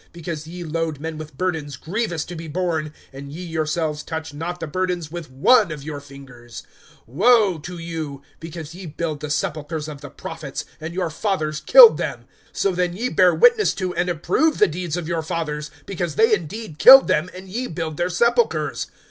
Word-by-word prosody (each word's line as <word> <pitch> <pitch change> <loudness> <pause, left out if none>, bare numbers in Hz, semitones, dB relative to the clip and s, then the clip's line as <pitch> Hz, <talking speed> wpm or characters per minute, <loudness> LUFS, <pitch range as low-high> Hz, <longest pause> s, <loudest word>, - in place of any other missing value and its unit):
because 165 -2 -6
ye 175 +2 -7
load 160 -2 -3
men 160 +1 -5
with 155 -3 -9
burdens 160 -6 -2
grievous 175 - -3
to 175 - -8
be 165 0 -7
borne, 160 -2 -2 0.2
and 140 +1 -9
ye 170 +5 -7
yourselves 155 -1 -2
touch 160 -1 -6
not 170 +4 -5
the 165 - -4
burdens 175 -1 -2
with 170 -3 -7
one 190 - +4
of 150 -2 -7
your 150 -1 -5
fingers. 130 -4 -12 0.4
(47)Woe 195 - +3
to 175 +3 -7
you! 160 -4 -6 0.2
because 165 -1 -8
ye 180 0 -9
build 155 0 -4
the 150 - -6
sepulchres 150 +1 -3
of 145 -2 -8
the 145 - -8
prophets, 155 0 -7
and 160 +2 -7
your 180 -3 -1
fathers 155 -4 -2
killed 470 - +9
them. - - -4 0.3
(48)So 195 -2 0
then 180 -1 0
ye 240 +6 -2
bear 180 -5 +4
witness 470 -3 +4
to 185 -2 -3
and 175 +1 -1
approve 285 - +1
the - - +6
deeds 175 -1 -3
of 170 -3 -4
your 170 -1 -1
fathers; 155 -2 -4 0.2
because 175 -5 -4
they 225 0 +4
indeed 185 -2 -4
killed 270 +1 +10
them, 155 +4 +1
and 185 +1 -10
ye 240 +7 -3
build 160 -2 -5
their 175 - 0
sepulchres[11:48]. 180 - +1
165 Hz, 190 wpm, -22 LUFS, 150-180 Hz, 0.4 s, killed